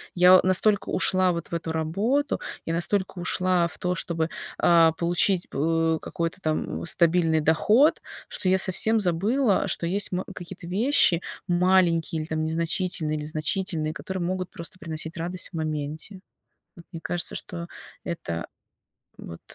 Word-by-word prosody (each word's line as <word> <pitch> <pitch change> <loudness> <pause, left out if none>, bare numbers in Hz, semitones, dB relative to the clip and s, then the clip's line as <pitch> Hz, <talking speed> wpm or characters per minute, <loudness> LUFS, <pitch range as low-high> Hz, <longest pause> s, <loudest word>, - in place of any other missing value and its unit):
Я 180 +1 +7
настолько 195 +2 +4
ушла 185 -1 +2
вот 170 -1 -5
в - - -5
эту 165 -1 -3
работу, 200 - 0 0.3
я 165 - -1
настолько 190 +2 -1
ушла 180 0 +1
в - - -11
то, 180 0 -1
чтобы, 165 0 -2 0.3
а, 165 -2 +5
получить 175 +2 +1
п 165 +2 0
какой-то 165 +2 -4
там 155 -4 -2
м - - -6
стабильный 165 -1 +3
доход. 210 - +3 0.3
Что 185 - -2
я 190 +1 +4
совсем 220 +4 +2
забыла, 200 +4 +1
что 170 - -2
есть 195 +2 0
м 180 +1 -2
какие-то 175 0 -9
вещи 195 - +3 0.2
маленькие 175 -2 +2
или - - -6
там 160 -1 -2
незначительные 165 -1 -1
или 150 - -5
значительные, 155 0 -2
которые 190 -2 -5
могут 185 0 -3
просто 170 +2 -9
приносить 160 -1 -5
радость 175 +2 -4
в - - -23
моменте. 155 +5 -4 0.6
Вот 170 - -13
мне 165 - -7
кажется, 175 +1 -3
что 170 -1 -6 0.3
это 85 - -5 0.7
вот 85 - -10
175 Hz, 150 wpm, -25 LUFS, 160-185 Hz, 0.7 s, Я